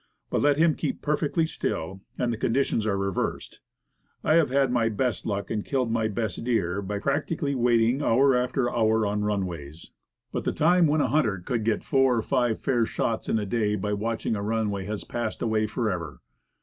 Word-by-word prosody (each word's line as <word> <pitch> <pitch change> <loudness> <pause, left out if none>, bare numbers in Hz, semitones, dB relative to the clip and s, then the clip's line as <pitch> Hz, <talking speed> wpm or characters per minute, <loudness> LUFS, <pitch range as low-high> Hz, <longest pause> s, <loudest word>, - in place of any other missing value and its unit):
But - - +1
let 145 -1 +3
him 165 0 +4
keep - - -4
perfectly 150 +2 +1
quiet 95 - -3 0.2
and 120 -1 0
the - - -4
conditions 115 -2 0
are 100 -2 +1
reversed. 100 -1 -3 0.6
I - - +3
have 160 -4 +4
had 135 -1 +2
my 115 -2 +2
best 120 +2 -1
luck, 100 -2 -3
and 105 -2 -1
killed 130 -4 -1
my 115 -1 +1
best 110 -1 -3
deer, 100 -6 0
by 100 +1 -3
patiently 140 +4 -1
waiting 120 +1 +2
hour 135 +1 +4
after 125 +1 0
hour 110 -2 +2
on 105 0 -1
runways. 85 -7 -4 0.4
But - - -3
the - - -1
time 175 +2 +4
when 150 +1 +2
a 130 - +1
hunter 115 -8 +2
could 110 +6 -3
get 110 0 0
four 135 -2 +3
or 110 - 0
five 120 -4 +1
fair 120 -3 +1
shots 115 -1 -2
in - - +2
a 105 - -1
day 105 0 0
by 105 +1 -2
watching 110 +2 -2
a 100 - -3
runway 105 -2 -1
has 105 0 -4
passed 120 -2 -4
away 110 -1 +1
forever. 95 -9 -3
115 Hz, 195 wpm, -26 LUFS, 105-130 Hz, 0.6 s, him